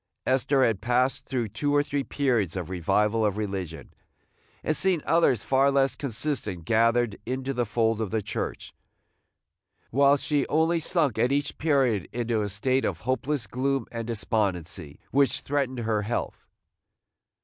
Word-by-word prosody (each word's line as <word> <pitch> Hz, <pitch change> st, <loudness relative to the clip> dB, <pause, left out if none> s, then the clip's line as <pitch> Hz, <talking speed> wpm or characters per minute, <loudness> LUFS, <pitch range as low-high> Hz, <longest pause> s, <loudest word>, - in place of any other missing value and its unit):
Esther 130 Hz, +1 st, +3 dB
had 105 Hz, -4 st, 0 dB
passed 125 Hz, +3 st, +1 dB
through 125 Hz, -4 st, -2 dB
two 145 Hz, +8 st, -1 dB
or 145 Hz, -, +4 dB
three 145 Hz, -1 st, -2 dB
periods 120 Hz, -, 0 dB
of 90 Hz, -2 st, -4 dB
revival 105 Hz, +5 st, +1 dB
of 105 Hz, -1 st, +1 dB
religion, 95 Hz, -6 st, -5 dB, 0.7 s
and 155 Hz, -, +1 dB
seen 185 Hz, -4 st, +2 dB
others 165 Hz, -9 st, +3 dB
far 135 Hz, +1 st, +3 dB
less 135 Hz, -2 st, +2 dB
consistent 115 Hz, -, -3 dB
gathered 115 Hz, 0 st, +2 dB
into 130 Hz, +3 st, -3 dB
the 120 Hz, -2 st, -1 dB
fold 115 Hz, +1 st, +1 dB
of 110 Hz, -, -2 dB
the 110 Hz, 0 st, -1 dB
Church, -, -, -5 dB, 1.2 s
while 140 Hz, +3 st, +5 dB
she 145 Hz, 0 st, 0 dB
only 160 Hz, +2 st, +2 dB
sunk 155 Hz, -, +1 dB
at 120 Hz, +3 st, +3 dB
each 140 Hz, 0 st, 0 dB
period 135 Hz, -, +1 dB
into 115 Hz, -2 st, -1 dB
a 105 Hz, -, -2 dB
state 130 Hz, +7 st, 0 dB
of -, -, -2 dB
hopeless 130 Hz, 0 st, -1 dB
gloom 130 Hz, +3 st, -1 dB
and 115 Hz, -1 st, -5 dB
despondency 95 Hz, -9 st, -2 dB
which 140 Hz, 0 st, +2 dB
threatened 135 Hz, -3 st, -1 dB
her 110 Hz, -2 st, 0 dB
health. 115 Hz, +4 st, -4 dB
120 Hz, 150 wpm, -26 LUFS, 105-140 Hz, 1.2 s, while